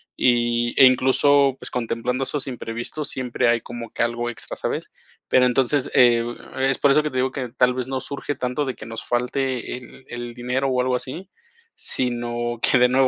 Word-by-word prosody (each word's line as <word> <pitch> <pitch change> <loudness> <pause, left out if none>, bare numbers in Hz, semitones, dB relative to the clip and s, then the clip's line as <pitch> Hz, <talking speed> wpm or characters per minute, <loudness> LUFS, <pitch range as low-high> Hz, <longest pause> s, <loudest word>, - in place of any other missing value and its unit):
Y, 120 -1 +2
eh, - - +10
incluso 135 +2 +4
pues, - - -7
contemplando 125 +2 -2
esos 145 +1 -2
imprevistos, 120 +3 -4
siempre 125 -1 0
hay 120 0 +3
como 120 0 -8
que - - 0
algo 120 0 -1
extra, 120 - -7
¿sabes? - - -4 0.4
Pero 125 - +4
entonces, 130 +2 +1
eh, 120 -2 +5 0.4
es 135 0 +2
por 140 - +4
eso 150 +2 +4
que 150 - -1
te 130 - -5
digo 130 +1 +1
que 130 -3 -4
tal 125 +2 +2
vez, 130 -1 -3
no 130 0 -2
surge 140 +2 -4
tanto 125 +3 -2
de 130 -3 -3
que 110 - -10
nos 115 0 -6
falte 125 +1 -1
el 130 +1 -14
el 120 0 -6
dinero 125 +2 -1
o 130 -1 0
algo 125 0 +1
así, 165 +10 -6 0.5
sino 120 -1 0
que - - +4
de 125 0 +5
nuevo, 130 +1 +3
125 Hz, 195 wpm, -22 LUFS, 120-130 Hz, 0.5 s, eh